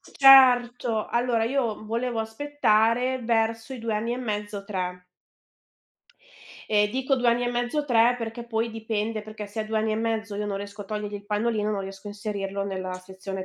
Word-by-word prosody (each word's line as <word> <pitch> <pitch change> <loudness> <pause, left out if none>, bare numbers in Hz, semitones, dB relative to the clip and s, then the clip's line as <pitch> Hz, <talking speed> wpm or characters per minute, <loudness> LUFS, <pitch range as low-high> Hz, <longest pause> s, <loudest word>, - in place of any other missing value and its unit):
certo; 245 -4 +5
allora, 235 -2 +1
io 235 -4 -1
volevo 230 +1 -2
aspettare 245 0 +1
verso 225 +1 0
i - - -8
2 225 -1 -3
anni 230 +3 -1
e - - -2
mezzo, 210 -4 -4
3. 180 -3 -4 1.7
E 210 -1 +3
dico 265 +4 0
2 245 -1 +2
anni 235 +1 +2
e 240 - 0
mezzo, 245 +5 -1
3, 240 -2 +4
perché 230 +1 -5
poi 230 0 -1
dipende, 220 0 -3
perché 215 -1 -8
se 205 +2 -5
a - - -2
2 220 0 -3
anni 220 0 0
e - - -1
mezzo, 225 -2 -2
io 210 0 -3
non 200 -1 -2
riesco 200 +1 -7
a - - -14
togliergli 210 0 -4
il 205 0 -8
pannolino, 210 0 0
non 200 -2 -1
riesco 195 +1 -9
a - - -4
inserirlo 200 -1 -4
nella 185 -2 -4
sezione 190 +1 -7
220 Hz, 185 wpm, -26 LUFS, 205-240 Hz, 1.7 s, certo